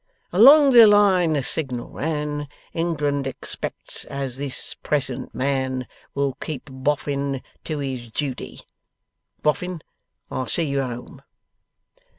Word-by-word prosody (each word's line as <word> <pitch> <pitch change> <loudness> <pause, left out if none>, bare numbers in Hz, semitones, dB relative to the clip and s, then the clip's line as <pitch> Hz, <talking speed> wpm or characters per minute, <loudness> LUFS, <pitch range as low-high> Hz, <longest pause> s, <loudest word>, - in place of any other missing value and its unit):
"Along 275 - +8
the 235 -3 +10
line 195 -5 +5
the 145 -3 0
signal 125 -4 -3
ran 150 -1 -2 0.3
England 145 -5 0
expects 135 - -5
as 135 -2 -4
this 140 -1 -5
present 135 -4 -2
man 130 -1 -1 0.3
Will 140 -1 +1
keep 150 -2 -5
Boffin 140 0 -1 0.2
to 155 - -2
his 130 -4 -4
duty." 135 +2 -4 0.8
Boffin, 170 +2 0 0.5
I'll 130 -1 -2
see 170 - +1
you 140 -3 0
home. 125 -2 -6
140 Hz, 115 wpm, -23 LUFS, 130-160 Hz, 0.8 s, the